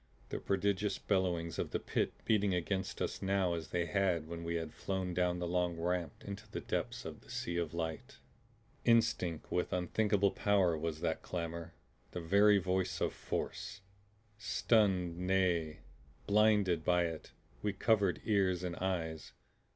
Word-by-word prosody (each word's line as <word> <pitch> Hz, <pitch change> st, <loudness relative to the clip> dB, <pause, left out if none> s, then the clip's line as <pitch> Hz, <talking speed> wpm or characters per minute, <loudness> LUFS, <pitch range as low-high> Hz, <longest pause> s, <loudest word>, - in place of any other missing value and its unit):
The -, -, -3 dB
prodigious 100 Hz, +1 st, 0 dB
bellowings 90 Hz, -5 st, 0 dB
of -, -, -1 dB
the -, -, -1 dB
Pit -, -, -1 dB
beating 105 Hz, -4 st, +3 dB
against 95 Hz, +2 st, -2 dB
us -, -, -3 dB
now 95 Hz, -2 st, +1 dB
as 80 Hz, -3 st, -4 dB
they 85 Hz, +3 st, -1 dB
had 90 Hz, -5 st, +1 dB
when 85 Hz, 0 st, -6 dB
we 85 Hz, 0 st, -2 dB
had 80 Hz, -2 st, -3 dB
flown 95 Hz, -2 st, -2 dB
down 90 Hz, 0 st, +1 dB
the 90 Hz, -, -2 dB
long 90 Hz, -1 st, 0 dB
ramp 90 Hz, 0 st, -2 dB
into 100 Hz, +2 st, -7 dB
the -, -, -4 dB
depths -, -, -3 dB
of -, -, -7 dB
the -, -, -20 dB
Sea 85 Hz, 0 st, -3 dB
of 85 Hz, -3 st, -1 dB
Light. 85 Hz, -, -4 dB, 0.7 s
Instinct 115 Hz, -8 st, +2 dB
with 90 Hz, -, 0 dB
unthinkable 100 Hz, +2 st, +2 dB
power 95 Hz, -5 st, +3 dB
was 80 Hz, 0 st, -3 dB
that -, -, -1 dB
clamor; 85 Hz, -1 st, -5 dB, 0.4 s
the -, -, -3 dB
very 100 Hz, +5 st, +5 dB
voice 95 Hz, -1 st, 0 dB
of -, -, 0 dB
Force. 95 Hz, -, -4 dB, 0.6 s
Stunned, 95 Hz, -4 st, +2 dB
nay 90 Hz, -4 st, +1 dB, 0.4 s
BLINDED, 105 Hz, -5 st, +3 dB
by 90 Hz, +1 st, +3 dB
it, 80 Hz, -2 st, -6 dB, 0.3 s
we 105 Hz, -, 0 dB
covered 100 Hz, -2 st, +2 dB
ears 95 Hz, -4 st, +2 dB
and 90 Hz, -1 st, -3 dB
eyes. 80 Hz, -4 st, -3 dB
90 Hz, 155 wpm, -34 LUFS, 85-100 Hz, 0.7 s, very